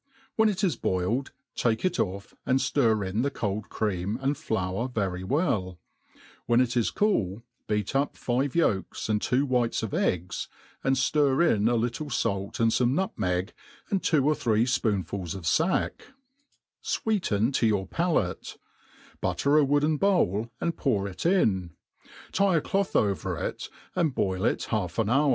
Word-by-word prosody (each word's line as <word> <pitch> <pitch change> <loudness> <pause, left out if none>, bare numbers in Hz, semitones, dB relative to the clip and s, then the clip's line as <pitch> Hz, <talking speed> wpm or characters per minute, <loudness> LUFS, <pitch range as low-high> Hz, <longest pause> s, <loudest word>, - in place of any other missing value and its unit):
When 220 -1 +4
it 205 -1 -2
is 185 - +2
boiled, 95 +9 -1 0.2
take 115 +6 0
it 180 -1 0
off, 100 +1 -2
and 130 - +2
ftir 115 -6 +1
in 100 +5 -1
the 140 - +1
cold 105 -4 -3
cream, 100 0 -2
and 135 +2 0
Soar 110 -5 -2
very 95 -6 -2
well; 95 - 0 0.7
when 120 +1 +4
it 125 0 +1
is 120 -2 +2
cool, 115 - 0 0.2
beat 105 +2 -1
up 140 +2 0
five 130 +3 -1
ydlks 110 - 0
and 105 -1 +1
two 130 +3 +1
'whites 125 -4 0
of 110 - -4
eggs, 90 0 -1 0.4
and 135 0 +2 0.2
&n 145 -1 +3
in 110 -10 +3
a 120 - +3
little 120 +6 -2
fait 100 -5 -2
and 115 -1 +3
fo 125 - +2
me 130 - +1
nutmeg, 95 - -1 0.4
and 195 -2 +1
two 150 -5 +2
or 155 - +4
three 115 -4 +1
fpoonftils 100 -8 -1
of 95 -4 -7
fack; 160 - +1 0.8
fweeten 140 - 0
to 115 - +2
your 100 -3 +1
palate; 165 - -1 0.6
butter 140 +1 +1
a - - +5
wooden 145 +2 +2
bowl, 120 - +2
and 170 -1 -2
pour 105 -8 0
it 100 - -3
in, 95 - +2 0.6
tie 195 -2 +3
a - - +1
cloth 195 +4 -1
over 100 -3 +1
it, - - -4 0.3
and 165 -7 +1
bpil 95 +1 +1
it - - -5
half 95 -6 -2
an 110 -2 +1
hou' 140 +4 +3
115 Hz, 165 wpm, -27 LUFS, 100-145 Hz, 0.8 s, a